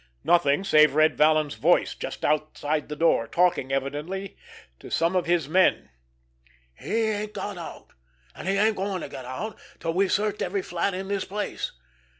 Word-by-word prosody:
Nothing, 170 Hz, -1 st, +3 dB
save 155 Hz, -6 st, +5 dB
Red 155 Hz, 0 st, +4 dB
Vallon's 155 Hz, -1 st, +3 dB
voice -, -, +2 dB
just -, -, -6 dB
outside 150 Hz, 0 st, -1 dB
the 150 Hz, -, -4 dB
door, 150 Hz, -7 st, +2 dB
talking, 175 Hz, -5 st, +1 dB
evidently, 150 Hz, +9 st, -3 dB, 0.4 s
to -, -, -11 dB
some 170 Hz, +3 st, +1 dB
of 180 Hz, -2 st, +1 dB
his 170 Hz, -4 st, +1 dB
men: 185 Hz, +4 st, +2 dB, 0.8 s
"He 225 Hz, -, -2 dB
ain't 210 Hz, -1 st, -2 dB
got 205 Hz, -, -4 dB
out—and 60 Hz, -, -12 dB
he 195 Hz, -, +2 dB
ain't 215 Hz, +2 st, +2 dB
going 190 Hz, -1 st, -2 dB
to -, -, -6 dB
get 130 Hz, -, -8 dB
out 130 Hz, -, -6 dB, 0.2 s
till 165 Hz, -, -2 dB
we've 190 Hz, +2 st, +1 dB
searched 210 Hz, +1 st, 0 dB
every 190 Hz, +1 st, -1 dB
flat 175 Hz, +2 st, -1 dB
in 190 Hz, +1 st, -5 dB
the 200 Hz, 0 st, -1 dB
place! 205 Hz, +2 st, -4 dB
170 Hz, 165 wpm, -25 LUFS, 150-195 Hz, 0.8 s, save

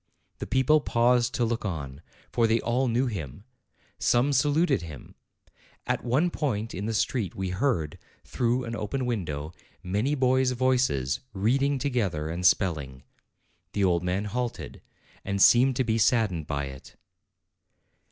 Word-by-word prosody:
The -, -, -5 dB
people 140 Hz, +4 st, +3 dB
paused 120 Hz, -1 st, +2 dB
to 120 Hz, -, +1 dB
look 115 Hz, 0 st, -2 dB
on, 75 Hz, -8 st, -5 dB, 0.3 s
for 115 Hz, -1 st, +2 dB
they 115 Hz, +1 st, +2 dB
all 125 Hz, +3 st, 0 dB
knew 120 Hz, +3 st, +1 dB
him: 80 Hz, -, -5 dB, 0.6 s
some 125 Hz, +4 st, +2 dB
saluted 145 Hz, +2 st, +2 dB
him. 75 Hz, -6 st, -10 dB, 0.7 s
At -, -, -1 dB
one 140 Hz, +9 st, +1 dB
point 115 Hz, -9 st, -2 dB
in 100 Hz, +4 st, -4 dB
the 115 Hz, -, -2 dB
street 105 Hz, -3 st, -1 dB
we 95 Hz, -1 st, -3 dB
heard, 95 Hz, -, -1 dB, 0.2 s
through 125 Hz, +1 st, -1 dB
an 115 Hz, -1 st, -5 dB
open 110 Hz, +5 st, -3 dB
window, 80 Hz, -10 st, -3 dB, 0.3 s
many 105 Hz, +11 st, 0 dB
boys' 130 Hz, -1 st, +2 dB
voices, 125 Hz, -, +1 dB
reading 135 Hz, +8 st, +1 dB
together, 105 Hz, -, -1 dB
and 85 Hz, +2 st, -4 dB
spelling. 70 Hz, -9 st, +1 dB, 0.7 s
The 100 Hz, -, 0 dB
old 90 Hz, -2 st, +2 dB
man 90 Hz, +3 st, -1 dB
halted, 120 Hz, +3 st, -4 dB, 0.4 s
and 100 Hz, 0 st, -2 dB
seemed 125 Hz, +6 st, +6 dB
to 130 Hz, -, +1 dB
be 115 Hz, -2 st, 0 dB
sad 115 Hz, -2 st, +3 dB
dened 80 Hz, -4 st, -5 dB
by 70 Hz, -1 st, -2 dB
it. 65 Hz, -1 st, -11 dB
115 Hz, 150 wpm, -27 LUFS, 90-130 Hz, 0.7 s, seemed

